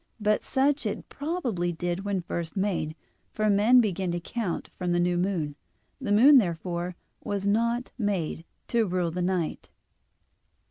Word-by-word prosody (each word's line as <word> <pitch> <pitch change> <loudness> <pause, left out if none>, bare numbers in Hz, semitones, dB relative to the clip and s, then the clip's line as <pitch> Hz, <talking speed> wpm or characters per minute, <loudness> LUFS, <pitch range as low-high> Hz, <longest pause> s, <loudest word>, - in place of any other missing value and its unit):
But 210 0 +2
such 275 -1 +1
it 205 - -4
probably 255 - -2
did 175 +2 -3
when 200 -2 -1
first 170 +1 -4
made; 185 -6 -1 0.4
for 215 -1 +2
men 220 +5 +6
begin 190 -4 -1
to 175 - -1
count 200 0 -4
from 180 -1 -1
the 175 - +2
new 175 0 +2
moon. 175 -5 -1 0.5
The - - -3
moon, 260 +7 +8
therefore, 175 -2 -2 0.3
was 200 -1 -2
not 235 +4 +1
made 190 -7 -1 0.3
"to 230 -3 +2
rule 180 -2 0
the 180 +2 -3
night." 180 -3 -1
195 Hz, 150 wpm, -27 LUFS, 175-220 Hz, 0.5 s, moon